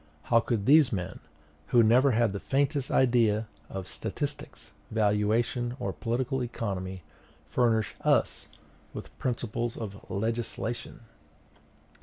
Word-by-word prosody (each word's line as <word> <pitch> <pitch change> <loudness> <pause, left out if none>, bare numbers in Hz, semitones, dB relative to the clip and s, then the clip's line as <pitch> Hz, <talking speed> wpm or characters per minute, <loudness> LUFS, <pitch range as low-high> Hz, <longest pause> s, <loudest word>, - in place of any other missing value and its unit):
How 115 - +4
could 115 -3 -1
these 145 +1 +6
men, 90 -2 -4 0.5
who 120 -1 +5
never 125 +5 +5
had 115 -4 +2
the 100 - -3
faintest 140 +2 0
idea 115 -4 +3 0.2
of 95 -1 -6
statistics, - - -5 0.2
valuation, 110 +3 +1
or 95 - -2
political 125 +3 -1
economy, 95 -7 -4 0.4
furnish 115 -4 +1
us - - +1 0.5
with - - -8
principles 120 -1 -2
of 100 -3 -8
legislation? 115 +3 -3
115 Hz, 110 wpm, -28 LUFS, 105-120 Hz, 0.5 s, these